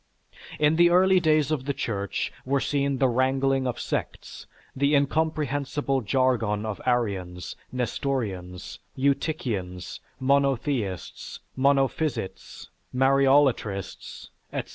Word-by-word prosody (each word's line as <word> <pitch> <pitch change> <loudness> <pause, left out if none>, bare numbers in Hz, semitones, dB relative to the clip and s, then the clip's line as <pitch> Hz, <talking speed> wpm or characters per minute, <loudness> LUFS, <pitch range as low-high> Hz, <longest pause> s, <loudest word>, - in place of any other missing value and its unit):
In 150 +1 +3
the 175 0 +6
early 185 +1 +5
days 155 -3 +2
of 140 -4 -1
the 140 -1 -2
Church 100 -3 -3
were 135 +1 +1
seen 140 -1 0
the 130 - +3
wrangling 130 +1 +1
of 125 - -3
sects, - - -5 0.3
the 140 +2 +2
incomprehensible 145 -2 0
jargon 110 -3 +1
of 110 -2 -4
Arians, 95 -8 -1 0.2
Nestorians, 110 -8 -3 0.2
Eutychians, 125 - -2 0.2
Monotheists, 135 - -1 0.2
Monophysites, 135 -4 -1 0.2
Mariolatrists, 135 -6 +1 0.2
etc. - - -4
135 Hz, 100 wpm, -26 LUFS, 115-140 Hz, 0.3 s, the